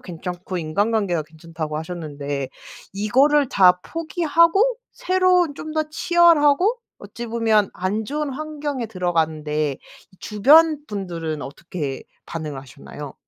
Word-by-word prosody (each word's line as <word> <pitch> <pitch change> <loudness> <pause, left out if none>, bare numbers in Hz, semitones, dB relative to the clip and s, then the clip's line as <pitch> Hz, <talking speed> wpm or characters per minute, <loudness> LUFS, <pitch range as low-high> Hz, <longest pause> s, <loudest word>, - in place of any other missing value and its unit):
괜찮고 180 +1 -6
인간관계도 185 +1 0
괜찮다고 160 0 -7
하셨는데 145 -5 -5 0.4
이거를 265 +8 +3
다 180 -4 +5
포기하고 335 +7 +2 0.2
새로운 365 -4 +2
좀 310 +2 -7
더 310 0 +1
치열하고 345 - +4 0.2
어찌 240 -1 -8
보면 225 -3 +2
안 200 +4 -2
좋은 295 +4 -3
환경에 290 -3 -4
들어갔는데 160 -6 -1 0.4
이 - - -21
주변 300 +9 +5
분들은 170 -7 -4
어떻게 145 -1 -6 0.2
반응을 155 -4 -5
하셨나요? 140 +1 -10
205 Hz, 290 characters per minute, -22 LUFS, -, 0.4 s, 다